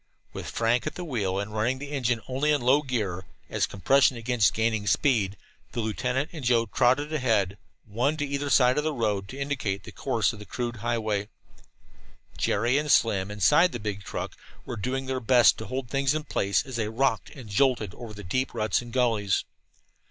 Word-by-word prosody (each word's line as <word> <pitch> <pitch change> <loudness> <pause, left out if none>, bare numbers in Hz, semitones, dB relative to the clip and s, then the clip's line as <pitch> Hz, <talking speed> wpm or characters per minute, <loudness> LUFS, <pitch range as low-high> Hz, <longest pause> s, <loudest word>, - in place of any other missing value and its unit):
With - - -6
Frank 115 +1 +1
at - - -4
the 180 - -5
wheel, 100 - -1
and 100 +1 -5
running 115 +4 0
the 145 +2 -8
engine 125 -5 0
only 135 +4 +1
in 145 - +3
low 130 +4 +4
gear, 105 -10 -3 0.3
as - - +1
compression 130 +6 +3
against 115 -1 +2
gaining 110 -2 0
speed, 105 -9 +2 0.4
the - - -3
lieutenant 125 +6 -1
and 155 -4 -7
Joe 120 -1 +3
trotted 130 +7 +2
ahead, 110 -9 +1 0.3
one 120 +8 0
on 150 - -2
either 140 0 -2
side 125 0 +4
of - - -1
the 155 0 -1
road, 105 -5 -1
to 130 - -9
indicate 130 -9 -2
the - - -10
course - - 0
of 110 - -10
the 105 - -9
crude 120 +1 -4
highway. 110 -3 -1 1.1
Jerry 120 +7 +1
and 150 -1 -1
Slim, 100 -4 +3
inside 150 - +4
the 120 - -4
big 105 -2 -4
truck, - - -5 0.3
were 120 - -5
doing 130 +5 -3
their 130 0 -2
best 120 -1 +5
to 110 - -6
hold 130 +1 -4
things 135 +1 +1
in 155 - -2
place 100 -4 0
as 130 -3 -5
they 110 -2 -1
rocked 115 0 0
and 130 -6 -10
jolted 110 -1 +1
over 115 -3 -9
the 105 - -9
deep 130 +9 -2
ruts 110 +1 +1
and 120 -1 -10
gullies. 115 -6 +1
120 Hz, 195 wpm, -27 LUFS, 105-135 Hz, 1.1 s, best